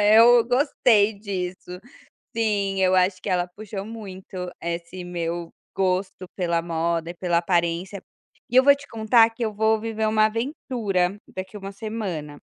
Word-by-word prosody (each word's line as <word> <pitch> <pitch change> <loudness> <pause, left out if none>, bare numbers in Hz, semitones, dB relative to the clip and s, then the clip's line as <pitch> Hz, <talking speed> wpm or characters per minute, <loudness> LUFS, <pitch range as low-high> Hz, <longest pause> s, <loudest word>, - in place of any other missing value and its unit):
Eu 235 0 +7
gostei 245 -5 +3
disso. 180 -3 -5 0.6
Sim, 200 -4 0
eu 185 0 +4
acho 185 0 +2
que - - -4
ela 180 -1 +1
puxou 205 -2 -6
muito 190 -4 -7
esse 170 +2 -5
meu 170 -1 -4 0.3
gosto 185 -1 -1
pela 170 -3 0
moda 165 0 -1
e - - -11
pela 175 -1 0
aparência, 175 +2 0 0.5
e 245 - -4
eu 260 - +8
vou 280 +1 +7
te 280 - -13
contar 225 +1 +4
que 230 +1 -5
eu 215 -1 -2
vou 220 +1 +2
viver 220 0 -2
uma 215 0 +4
aventura 220 - -1 0.2
daqui 190 +2 -6
1 195 0 -7
semana. 195 -9 -5
195 Hz, 155 wpm, -24 LUFS, 180-220 Hz, 0.6 s, eu